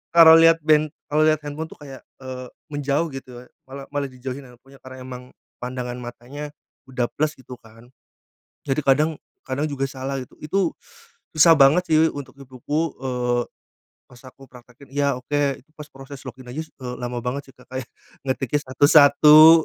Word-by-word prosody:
kalau 165 -1 +10
liat 165 0 +6
ben 155 0 +4 0.2
kalo 155 +1 +3
liat 155 -1 +3
handphone 150 +2 -5
tuh - - -14
kayak, 135 -3 -11 0.2
eee, 130 -1 -7 0.2
menjauh, 145 +2 0
gitu 125 -2 -9
ya, - - -20 0.2
mala 135 +1 -8
malah 140 -1 -1
dijauhin 130 +2 -7
handphonenya. 130 +3 -18
Karena 130 0 -10
emang 125 -1 -8 0.4
pandangan 125 0 -5
matanya, 125 +5 -8 0.4
udah 125 -2 -1
plus, 155 +1 0
gitu 130 0 -11
kan. 115 +2 -17 0.8
Jadi 135 +2 -1
kadang 150 +3 +2 0.3
kadang 135 +3 -2
juga 135 -1 -2
salah. 135 +1 -4
Itu 165 +7 -2 0.6
susah 165 +1 +7
banget 150 +6 +5
sih, 155 - +5 0.2
untuk 140 -2 -8
ibuku, 140 +4 -3
eee, 125 -2 -1 0.7
pas 125 -1 -16
aku 135 +1 -16
praktekin, 125 +2 -17
iya, 140 -2 +1
oke. 140 +1 -1
Pas 150 -1 -10
proses 135 0 -11
log 125 - -8
in 125 - -13
aja 155 - -4
su - - -29
eee, 125 -1 -6
lama 125 0 -4
banget 135 +3 -4
sih, - - -23
Kak. 125 - -18
Kayak 130 -2 -5 0.4
ngetiknya 135 +2 -1
satu-satu, 150 +3 +7
135 Hz, 170 wpm, -22 LUFS, 125-150 Hz, 0.8 s, kalau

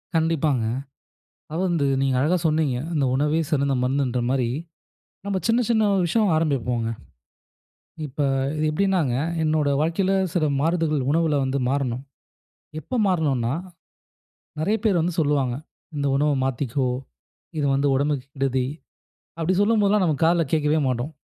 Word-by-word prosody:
கண்டிப்பாங்க. 160 -6 +1 0.8
அதாவது 165 +5 -1
வந்து 165 -5 +1 0.2
நீங்க 135 -1 +1
அழகா 170 +6 +2
சொன்னீங்க. 155 -5 +1 0.2
அந்த 145 -4 +1
உணவே 150 +4 +1
சிறந்த 140 -2 +1
மருந்துன்ற 130 -1 0
மாரி, 130 -3 +1 0.8
நம்ம 200 -2 -1
சின்ன 230 +2 +3
சின்ன 220 -2 +3
ஒரு 190 - +2
விஷயம் 205 +1 +2
ஆரம்பிப்போங்க. 125 -7 0 1.2
இப்ப, 145 +2 -5 0.5
எப்படினாங்க 170 -4 +1 0.3
என்னோட 155 -2 +1
வாழ்க்கையில 170 +5 +1 0.2
சில 170 -4 +1 0.2
மாறுதகள் 155 -4 0
உணவுல 160 -2 +2
வந்து 135 +1 -1
மாறணும். 130 -2 -1 0.8
எப்ப 250 +9 -3
மாறணும்னா, 140 -10 +1 1.1
நெறைய 200 +8 +1
பேர் 195 -6 +3
வந்து 170 +1 -1
சொல்லுவாங்க, 140 -5 +1 0.4
"இந்த 140 -1 -1
உணவை 150 +1 +2
மாத்திக்கோ. 130 0 -1 0.7
இது 145 - +1
வந்து 140 +1 +2
உடம்புக்கு 140 -1 0
கெடுதி" 130 -2 0 0.7
அப்படி 165 +2 0
சொல்லும்போதெல்லாம் 205 -1 +3
நம்ம 155 -4 +1
காதுல 170 0 +3
கேக்கவே 155 0 +2
மாட்டோம். 125 +3 -2
150 Hz, 125 wpm, -23 LUFS, 135-170 Hz, 1.2 s, சின்ன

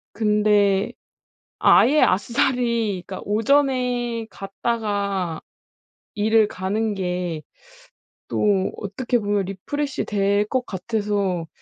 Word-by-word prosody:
근데 210 -2 +2 0.7
아예 300 +3 +5
아싸리 235 -1 +1
그러니까 190 - -6
오전에 245 -1 +1
갔다가 200 -4 -2 0.8
일을 220 +1 +3
가는 210 +3 -2
게 180 -4 -3 0.9
또 200 -2 +1
어떻게 235 +5 -2
보면 205 -3 0
리프레시 275 +9 -3
될 200 0 +1
것 255 +3 -1
같아서 200 -3 -2
210 Hz, 190 characters per minute, -22 LUFS, 195-235 Hz, 0.9 s, 아예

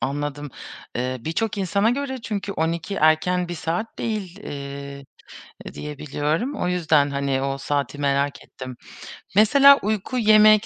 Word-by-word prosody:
Anladım. 145 +1 -3 0.5
Eee, 125 +1 -1
birçok 195 - -2
insana 200 +4 +2
göre 265 0 -2
çünkü 200 -2 -3
12 165 +3 -2
erken 175 +2 +2
bir 175 - -4
saat 175 +7 -3
değil, 200 -5 -3
eee, 140 0 -7 0.7
diye 150 -1 -7
biliyorum. 155 - -1
O 180 - -1
yüzden, 155 -5 +2
hani, 140 -1 -1
o 135 0 -2
saati 145 0 -2
merak 140 0 0
ettim. 130 -1 -9 0.6
Mesela 275 +7 +7
uyku, 215 +4 -1
yemek, 215 -1 +6
160 Hz, 135 wpm, -23 LUFS, 140-210 Hz, 0.7 s, Mesela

